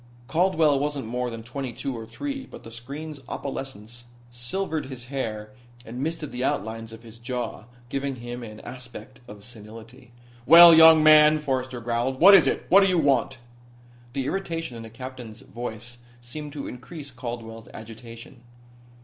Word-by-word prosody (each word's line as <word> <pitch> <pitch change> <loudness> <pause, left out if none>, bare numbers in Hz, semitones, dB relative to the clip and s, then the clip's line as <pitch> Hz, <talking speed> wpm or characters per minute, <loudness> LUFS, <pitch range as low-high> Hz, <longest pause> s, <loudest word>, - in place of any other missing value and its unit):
Caldwell 160 -4 +2
wasn't 145 -2 -2
more 125 +2 -3
than 115 -1 -8
twenty 130 +2 -5
two 135 +3 -5
or 115 -1 -8
three, 275 - -6
but - - -12
the 115 - -11
screen's 140 +6 -8
opalescence 120 -4 -7 0.3
silvered 155 +7 -3
his 130 -3 -8
hair 110 -5 -4 0.3
and 120 +3 -7
misted 155 0 -3
the 125 +1 -4
outlines 115 -2 -3
of 115 +1 -12
his 115 0 -14
jaw, 120 -2 -5 0.2
giving 135 +1 -3
him 120 0 -7
an 110 -2 -10
aspect 125 0 -10
of 105 -1 -12
senility. 115 +3 -13 0.4
"Well, 170 +3 +10
young 160 -1 +8
man," 155 0 +7
Forrester 130 -4 -3
growled. 120 +3 -2
"What 195 +4 +9
is 170 -8 +7
it? - - -1
What 195 - +8
do 195 - +4
you 185 -2 +2
want?" 135 -4 +1 0.8
The 135 -1 -2
irritation 165 -5 -3
in 115 - -8
the 115 - -9
captain's 125 -2 -9
voice 120 0 -7 0.2
seemed 145 +5 -8
to 145 -2 -6
increase 140 +3 -9
Caldwell's 115 -3 -7
agitation. 115 +2 -11
125 Hz, 160 wpm, -25 LUFS, 115-150 Hz, 0.8 s, Well